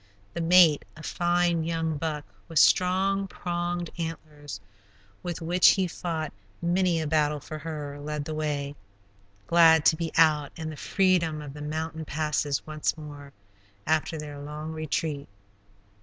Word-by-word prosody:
The 170 - -3
mate, 165 -3 +6
a 155 - -11
fine 175 -1 +1
young 165 -1 -1
buck, 150 -1 -3 0.2
with 165 - -5
strong, 190 +4 +4
pronged 175 -2 -3
antlers, 155 -3 -6 0.6
with 175 -2 -5
which 175 +2 +4
he 190 -2 +1
fought 165 -4 -4 0.3
many 175 0 +1
a 160 - -2
battle 150 -1 +1
for 155 +2 -8
her, 150 -3 -6
led 150 0 -4
the 155 - -4
way, 145 -2 -2 0.7
glad 160 +1 +6
to 160 - +6
be 165 0 -3
out 155 -3 +4
in 160 -1 -5
the - - -8
freedom 175 -3 +1
of 145 -2 -8
the 150 - -9
mountain 160 +1 -4
passes 150 -2 -1
once 155 +1 -2
more, 145 -2 -10 0.5
after 160 +1 +1
their 150 -1 -7
long 150 +2 -6
retreat. 155 -3 -3
160 Hz, 145 wpm, -27 LUFS, 150-170 Hz, 0.7 s, mate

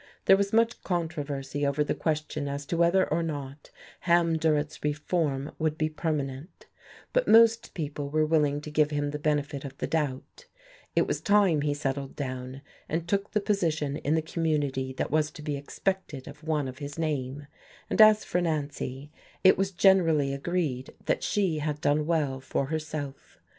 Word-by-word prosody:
There 195 - +8
was 200 0 0
much 230 +1 +2
controversy 145 -5 -3
over 140 +1 +2
the - - -1
question 155 -2 -2
as 140 0 -4
to 170 - -2
whether 170 +3 +4
or 170 - +1
not 145 -3 -5 0.3
Ham 170 -2 +3
Durrett's 155 -2 0
reform 150 -1 -1
would 155 -1 0
be 155 -1 0
permanent; 150 -1 -4 0.5
but - - +2
most 230 0 +5
people 145 -3 -4
were 155 +1 +2
willing 150 -2 +2
to 150 - -8
give 150 0 +3
him 145 -1 -1
the 150 - -4
benefit 145 -2 -1
of 135 -1 -8
the - - -2
doubt; 150 - -3 0.5
it - - +4
was - - -2
time 200 -7 +4
he 145 0 0
settled 135 -1 -3
down 130 0 -5 0.3
and 165 +2 -2
took 200 +2 0
the 210 - +1
position 160 -8 0
in 150 +3 0
the 160 - +1
community 145 -5 -1
that 130 - -3
was 155 0 +2
to 150 - -11
be 150 -1 -2
expected 145 0 -3
of 150 +2 -11
one 155 -3 0
of 130 +1 -8
his 145 0 -7
name; 145 -3 -2 0.4
and - - +3
as 215 0 +7
for 180 - 0
Nancy, 145 -3 -3 0.3
it 190 - +7
was 195 0 0
generally 170 -7 +3
agreed 140 -3 -2
that - - +1
she 185 -7 0
had 150 0 -2
done 150 +1 +1
well 150 -5 0
for 135 +1 -2
herself. 155 -2 -5
150 Hz, 175 wpm, -28 LUFS, 140-170 Hz, 0.5 s, There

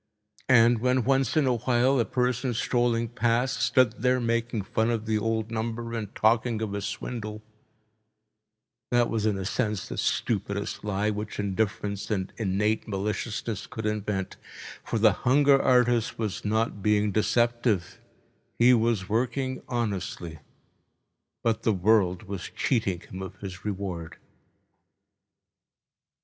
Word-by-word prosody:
And 120 -2 +6
when 125 +1 +2
once 135 +1 +1
in 150 - +4
a 125 -2 +2
while 125 +3 +2
a 115 - +2
person 125 +1 0
strolling 120 0 +1
past 120 +2 0
stood 125 -5 +2
there 125 +1 +3
making 115 -2 -1
fun 110 +4 0
of 115 -2 -1
the 110 -1 +1
old 110 +1 -1
number 115 +1 -3
and 110 -3 -5
talking 110 +1 +2
of 105 -2 -3
a 100 - -3
swindle, 105 0 -5 1.5
that 120 -1 +2
was 110 -1 0
in 105 -2 +1
a 95 - -4
sense 105 -2 -1
the - - -5
stupidest - - -1
lie 105 +1 0
which 105 +1 -5
indifference 100 0 -2
and 95 -4 -2
innate 105 +1 0
maliciousness 105 +1 -3
could 110 - -6
invent, 105 -2 -2 0.5
for - - -2
the 110 0 +5
hunger 140 +2 +5
artist 120 -3 +3
was 110 -4 -3
not 110 0 0
being 105 0 +2
deceptive—he 120 +1 0
was 115 -5 +1
working 130 +4 -1
honestly—but 100 - -5
the 110 - +2
world 95 -1 +2
was 100 -3 -6
cheating 100 -9 0
him 95 +1 -9
of 95 - -7
his 95 -3 -8
reward. 95 -5 -4
110 Hz, 130 wpm, -27 LUFS, 105-120 Hz, 1.5 s, And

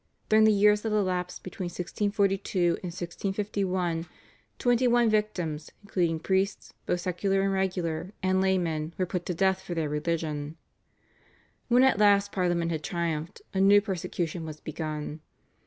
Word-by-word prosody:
During 215 0 +6
the 220 - +6
years 210 0 +4
that 220 - -2
elapsed 180 -3 -1
between 185 0 -6
1642 195 +2 -1 0.2
and 180 - -5
1651, 185 -1 -2 0.5
twenty 245 0 +3
one 240 -2 +4
victims, 175 -8 -1
including 170 -5 0
priests, 190 +4 -1
both 175 - 0
secular 195 +2 0
and 195 0 +1
regular, 180 -2 -1
and 190 0 +2
laymen, 170 -4 0
were 185 - +1
put 180 0 -4
to 180 - -2
death 190 +1 +2
for 185 -2 -5
their 160 -3 -1
religion. 150 0 -2 1.1
When 245 +1 +5
at 265 -6 +4
last 200 -1 +4
Parliament 175 -2 0
had 155 -2 -3
triumphed 170 0 -3
a 190 - 0
new 200 +1 +7
persecution 175 -4 -3
was 155 -1 -7
begun. 155 -1 -5
185 Hz, 145 wpm, -28 LUFS, 165-200 Hz, 1.1 s, new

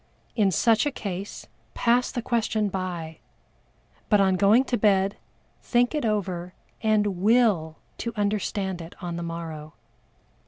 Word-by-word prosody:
In 210 -4 +3
such 220 - +3
a - - 0
case 200 -5 -6 0.3
pass 245 +1 +2
the 240 -3 -4
question 220 -3 0
by, 175 -4 -5 0.9
but 210 - +5
on 190 -1 +3
going 205 +7 +5
to 255 - -1
bed, 200 -2 +2 0.5
think 245 +2 +2
it 300 -5 -1
over 185 -4 -2 0.3
and 210 -3 +1
will 205 -8 +3 0.2
to 235 - -3
understand 200 -3 -1
it 165 +1 -10
on 175 -2 -5
the 170 - -4
morrow. 165 -2 -6
200 Hz, 135 wpm, -25 LUFS, 175-225 Hz, 0.9 s, but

